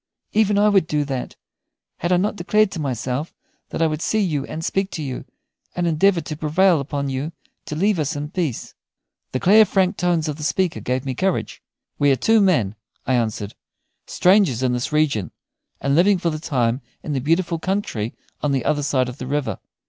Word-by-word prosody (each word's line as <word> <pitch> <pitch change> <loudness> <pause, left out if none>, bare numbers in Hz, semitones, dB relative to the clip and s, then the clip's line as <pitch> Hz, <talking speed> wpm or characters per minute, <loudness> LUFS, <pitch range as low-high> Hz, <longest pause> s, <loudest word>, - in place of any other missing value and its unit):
Even 210 -1 +3
I 205 +1 +5
would 195 -5 +3
do 150 -1 0
that, 135 -3 -4 0.6
had 175 - -1
not 205 +3 0
I - - -15
declared 210 +3 +2
to 170 - -5
myself 130 +1 -3 0.3
that - - -1
I - - +4
would 155 -1 -1
see 220 - 0
you 155 -9 0
and 160 +1 -5
speak 195 0 0
to 155 - -4
you, 130 -3 -5 0.5
and 175 - 0
endeavor 170 +2 +3
to 155 - -6
prevail 165 +3 +3
upon 140 0 -3
you 135 +4 -3 0.3
to 150 - -5
leave 195 +3 +2
us 150 +1 -1
in 145 +1 -5
peace." 165 -10 -3 0.6
The 130 - -1
clear, 210 +8 +7
frank 195 -1 +1
tones 170 -3 +1
of 150 -1 -3
the 155 - -7
speaker 175 +2 0
gave 130 +2 -2
me 135 - -2
courage. 185 +7 -1 0.4
"We 145 - +4
are - - +4
two 220 - +3
men," 150 - +2 0.3
I 130 - +1
answered, 110 -4 -1 0.5
"strangers 180 - +3
in 125 -1 +2
this 125 0 -2
region, 140 - +1 0.5
and 140 0 0
living 185 +6 +5
for 170 -1 -1
the 155 - -4
time 125 -5 0 0.2
in 150 - -3
the 135 - -1
beautiful 165 +3 +1
country 160 - -2 0.3
on 145 -2 0
the 135 - -1
other 145 -1 +1
side 140 -3 +1
of 125 +2 -8
the 125 - -5
river. 135 - -2
155 Hz, 200 wpm, -22 LUFS, 135-185 Hz, 0.6 s, clear